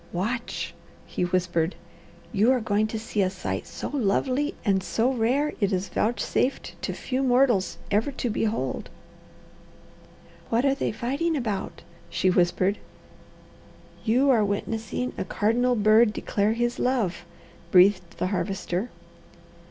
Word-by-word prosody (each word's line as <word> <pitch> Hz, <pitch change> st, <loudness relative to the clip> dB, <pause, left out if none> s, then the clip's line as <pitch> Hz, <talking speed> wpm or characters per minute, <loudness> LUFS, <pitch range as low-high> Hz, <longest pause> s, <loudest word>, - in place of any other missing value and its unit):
"Watch!" 180 Hz, -4 st, -3 dB, 0.3 s
he 180 Hz, -, -2 dB
whispered. 175 Hz, -1 st, 0 dB, 0.6 s
"You 215 Hz, +4 st, +4 dB
are 255 Hz, -, +1 dB
going 215 Hz, -1 st, +1 dB
to 220 Hz, -, -4 dB
see 215 Hz, -1 st, -2 dB
a 185 Hz, -, +2 dB
sight 185 Hz, -, -4 dB
so -, -, -5 dB
lovely 275 Hz, -, 0 dB
and 195 Hz, -3 st, +3 dB
so 230 Hz, +7 st, 0 dB
rare 260 Hz, +6 st, +1 dB
it 200 Hz, -2 st, +1 dB
is 185 Hz, 0 st, -1 dB
vouchsafed 240 Hz, +3 st, 0 dB
to -, -, -2 dB
few 260 Hz, 0 st, -3 dB
mortals 245 Hz, -6 st, +3 dB
ever 215 Hz, +7 st, +2 dB
to 245 Hz, -2 st, -2 dB
behold." 225 Hz, +1 st, -2 dB, 1.6 s
"What 235 Hz, +4 st, +2 dB
are 275 Hz, -, +4 dB
they 275 Hz, -, -1 dB
fighting 275 Hz, +9 st, -1 dB
about?" 215 Hz, -7 st, -3 dB, 0.3 s
she 185 Hz, -, +2 dB
whispered. 180 Hz, +3 st, +2 dB, 1.2 s
"You 255 Hz, +5 st, +3 dB
are 225 Hz, -4 st, +4 dB
witnessing 220 Hz, +4 st, -2 dB
a -, -, 0 dB
cardinal 235 Hz, +6 st, +1 dB
bird 215 Hz, +1 st, +5 dB
declare 205 Hz, +1 st, 0 dB
his 240 Hz, +1 st, -1 dB
love," 230 Hz, -10 st, 0 dB, 0.5 s
breathed 185 Hz, 0 st, +4 dB
the -, -, -1 dB
Harvester. 185 Hz, +3 st, -2 dB
220 Hz, 130 wpm, -26 LUFS, 195-250 Hz, 1.6 s, bird